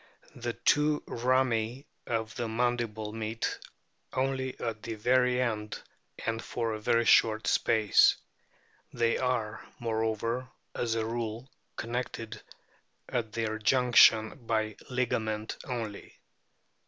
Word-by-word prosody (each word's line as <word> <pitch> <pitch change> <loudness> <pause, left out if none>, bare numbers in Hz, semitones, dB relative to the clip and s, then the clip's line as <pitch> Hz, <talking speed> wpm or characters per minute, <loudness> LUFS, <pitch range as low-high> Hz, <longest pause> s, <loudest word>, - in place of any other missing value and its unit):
The 120 -1 -3
two 150 +3 +2
rami 125 0 0 0.2
of 115 -1 -2
the 120 - -3
mandible 115 -2 -1
meet 110 0 -3 0.5
only 130 0 -1
at 110 -2 -3
the 115 0 -5
very 125 +3 +3
end 110 -4 -2 0.5
and 115 0 -1
for 115 -2 -2
a 110 - -4
very 115 +2 +2
short 110 -1 +5
space; 110 -2 +4 0.8
they 115 0 +1
are, 120 -4 -1
moreover, 115 +2 -1 0.2
as 115 -2 -1
a 110 -1 0
rule 115 +2 -4 0.2
connected 115 -1 -4 0.7
at 115 -3 -2
their 110 -1 -2
junction 115 0 +5
by 110 -2 0
ligament 110 -4 -1
only. 115 -5 -5
115 Hz, 110 wpm, -30 LUFS, 110-125 Hz, 0.8 s, short